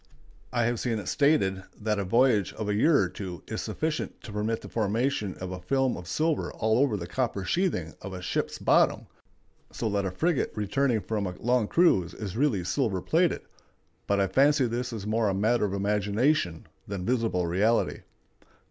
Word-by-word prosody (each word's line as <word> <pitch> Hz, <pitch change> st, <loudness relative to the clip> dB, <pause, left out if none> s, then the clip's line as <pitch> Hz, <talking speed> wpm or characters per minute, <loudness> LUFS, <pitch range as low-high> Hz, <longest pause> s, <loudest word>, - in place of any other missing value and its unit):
I 120 Hz, -1 st, +1 dB
have 120 Hz, 0 st, 0 dB
seen 115 Hz, -3 st, -1 dB
it 105 Hz, -, -5 dB
stated 100 Hz, -6 st, +2 dB, 0.2 s
that 105 Hz, -1 st, -1 dB
a -, -, 0 dB
voyage 115 Hz, 0 st, +3 dB
of 110 Hz, -, -5 dB
a 105 Hz, -, +1 dB
year 145 Hz, +9 st, +4 dB
or -, -, +2 dB
two 90 Hz, -4 st, -7 dB
is -, -, -4 dB
sufficient 155 Hz, 0 st, -3 dB
to 110 Hz, -, -8 dB
permit 105 Hz, +2 st, -2 dB
the -, -, -9 dB
formation 110 Hz, -1 st, -1 dB
of 95 Hz, 0 st, -6 dB
a 90 Hz, 0 st, -6 dB
film 130 Hz, +7 st, +1 dB
of 85 Hz, -, -9 dB
silver 155 Hz, -, 0 dB
all 110 Hz, +1 st, +1 dB
over 130 Hz, -6 st, +2 dB
the 85 Hz, -, -5 dB
copper 100 Hz, -1 st, -2 dB
sheathing 165 Hz, -, 0 dB
of 95 Hz, -, -7 dB
a 95 Hz, -, -6 dB
ship's 90 Hz, -, -2 dB
bottom, -, -, +3 dB, 0.7 s
so -, -, -3 dB
that 100 Hz, -1 st, 0 dB
a -, -, -1 dB
frigate 155 Hz, -, 0 dB
returning 110 Hz, +3 st, +1 dB
from 100 Hz, +1 st, -2 dB
a 90 Hz, -, -5 dB
long 120 Hz, -2 st, +1 dB
cruise 95 Hz, -, +3 dB
is 100 Hz, -3 st, -6 dB
really 120 Hz, -8 st, +1 dB
silver 100 Hz, +1 st, 0 dB
plated; 90 Hz, +1 st, +1 dB, 0.6 s
but 100 Hz, 0 st, +2 dB
I 100 Hz, -, +3 dB
fancy 140 Hz, +5 st, +3 dB
this 120 Hz, +2 st, -2 dB
is 110 Hz, -4 st, -5 dB
more 110 Hz, 0 st, +1 dB
a 95 Hz, -, -1 dB
matter 110 Hz, +3 st, +2 dB
of 100 Hz, -, -3 dB
imagination 105 Hz, -, +1 dB, 0.2 s
than 95 Hz, -2 st, -4 dB
visible 115 Hz, -7 st, +1 dB
reality. 100 Hz, +7 st, +1 dB
105 Hz, 190 wpm, -27 LUFS, 95-125 Hz, 0.7 s, year